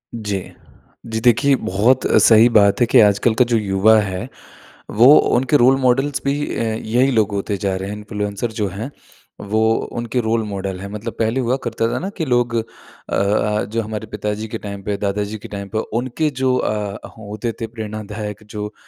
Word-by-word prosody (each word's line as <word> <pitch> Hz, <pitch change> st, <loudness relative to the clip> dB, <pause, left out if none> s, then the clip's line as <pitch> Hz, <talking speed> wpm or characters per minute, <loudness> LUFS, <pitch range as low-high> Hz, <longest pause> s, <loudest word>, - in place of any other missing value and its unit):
जी। 105 Hz, -4 st, -3 dB, 0.6 s
जी 110 Hz, -1 st, -3 dB
देखिए, 125 Hz, +4 st, +4 dB
बहुत 120 Hz, +4 st, +1 dB, 0.2 s
सही 115 Hz, +1 st, +7 dB
बात 100 Hz, -1 st, +4 dB
है -, -, +6 dB
कि 125 Hz, -, +5 dB
आजकल 105 Hz, +2 st, +3 dB
का 125 Hz, -, +4 dB
जो 120 Hz, -1 st, +1 dB
युवा 105 Hz, +1 st, +3 dB
है 100 Hz, +2 st, -3 dB, 0.7 s
वो 120 Hz, -, +8 dB, 0.3 s
उनके 130 Hz, +3 st, +2 dB
रोल 130 Hz, +1 st, +5 dB
मॉडल्स 135 Hz, +3 st, +1 dB
भी 140 Hz, -, +2 dB, 0.2 s
अ, -, -, -2 dB
यही 115 Hz, +4 st, 0 dB
लोग 110 Hz, -4 st, +2 dB
होते 100 Hz, 0 st, -2 dB
जा 95 Hz, 0 st, -1 dB
रहे 95 Hz, +1 st, -4 dB
हैं। 105 Hz, -, -5 dB
इन्फ्लुएंसर 105 Hz, +1 st, -4 dB
जो 105 Hz, -, +1 dB
हैं 105 Hz, +9 st, -6 dB, 0.6 s
वो 110 Hz, +1 st, +1 dB, 0.4 s
उनके 120 Hz, +1 st, -2 dB
रोल 115 Hz, 0 st, 0 dB
मॉडल 95 Hz, -3 st, -4 dB
है। 100 Hz, -, -6 dB
मतलब 110 Hz, +2 st, -5 dB
पहले 115 Hz, +3 st, +1 dB
हुआ 125 Hz, +1 st, 0 dB
करता 115 Hz, -1 st, -1 dB
था -, -, -1 dB
ना 190 Hz, -, -4 dB
कि 160 Hz, -, -1 dB
लोग 120 Hz, -3 st, +1 dB
अ 115 Hz, -, +2 dB, 0.5 s
अ, 105 Hz, +1 st, +1 dB
जो 115 Hz, +2 st, -2 dB
हमारे 110 Hz, 0 st, -6 dB
पिताजी 105 Hz, +1 st, -4 dB
के -, -, -5 dB
टाइम 100 Hz, -1 st, -7 dB
पे 100 Hz, +1 st, -2 dB
दादाजी 105 Hz, +1 st, -2 dB
के 105 Hz, -, -11 dB
टाइम 100 Hz, -1 st, -6 dB
पे -, -, +2 dB, 0.2 s
उनके 130 Hz, +5 st, -1 dB
जो 130 Hz, -2 st, 0 dB
अ, 105 Hz, -3 st, -3 dB
होते 110 Hz, +2 st, -5 dB
थे 115 Hz, -, -2 dB
प्रेरणादायक 110 Hz, -1 st, -6 dB
जो 105 Hz, 0 st, -6 dB
110 Hz, 190 wpm, -19 LUFS, 105-120 Hz, 0.7 s, वो